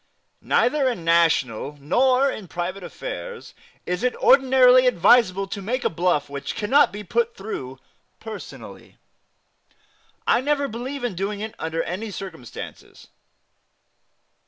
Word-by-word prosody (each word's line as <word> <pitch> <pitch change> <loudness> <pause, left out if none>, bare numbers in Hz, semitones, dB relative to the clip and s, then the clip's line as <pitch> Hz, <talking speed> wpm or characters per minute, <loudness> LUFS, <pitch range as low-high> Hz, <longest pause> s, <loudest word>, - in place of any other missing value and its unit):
Neither 270 +1 +2
in 185 -9 -5
national 150 -5 +2
nor 255 - +3
in 215 -8 -5
private 175 +3 -4
affairs - - -7 0.3
is 180 0 -2
it 250 0 0
ordinarily 255 -1 +5
advisable 195 -3 +4
to 200 - -5
make 245 +6 -2
a - - +1
bluff 170 -3 0
which 140 0 -6
cannot 270 +7 +3
be 210 +1 -7
put 235 +4 -1
through 135 -11 -6 0.4
personally, 220 -2 -10 1.3
I - - +3
never 285 +1 0
believe 245 +4 -6
in 245 -4 -1
doing 200 +3 -3
it 220 +1 -5
under 160 0 -2
any 200 +5 -5
circumstances. 180 - -9
210 Hz, 125 wpm, -23 LUFS, 175-255 Hz, 1.3 s, ordinarily